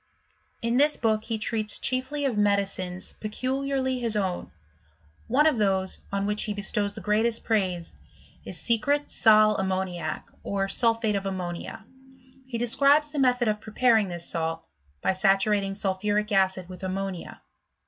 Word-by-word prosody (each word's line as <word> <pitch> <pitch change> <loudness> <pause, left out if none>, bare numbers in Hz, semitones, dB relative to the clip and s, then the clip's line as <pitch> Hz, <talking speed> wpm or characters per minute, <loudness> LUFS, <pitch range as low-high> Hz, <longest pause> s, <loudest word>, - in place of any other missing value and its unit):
— - - -41
In 235 +1 +1
this 295 +2 +4
book 220 -1 0
he 225 -1 -2
treats 215 -1 -1
chiefly 260 +3 -1
of 260 -5 0
medicines 195 -3 -1
pecuEarly 260 +3 -2
his 230 -2 -1
own; 190 -4 -2 0.8
one 280 +6 +3
of 300 -7 +3
those, 190 -2 +1
on 200 0 -1
which 210 +1 +1
he 210 - -3
bestows 205 0 0
the - - -7
greatest 220 +4 +1
praise, 185 -6 -1 0.5
is - - -6
secret 280 +5 +1
seu 215 -2 +5
ammaniacy 185 -4 -2 0.2
or 195 -1 -2
sulphate 225 0 +1
of 195 0 -2
ammo 185 -2 -3
nia. 175 +3 -8 0.6
He 245 -3 -4
describes 280 +6 +3
the 300 - -3
method 250 -2 +2
of 210 0 0
preparing 220 -1 +2
this 175 -1 -4
salt, 165 0 -2 0.4
by - - +2
saturating 195 +1 +2
sulphuric 205 +2 -1
acid 190 -2 +2
with 180 -1 -10
ammonia. 190 -1 -4
210 Hz, 150 wpm, -26 LUFS, 190-235 Hz, 0.8 s, seu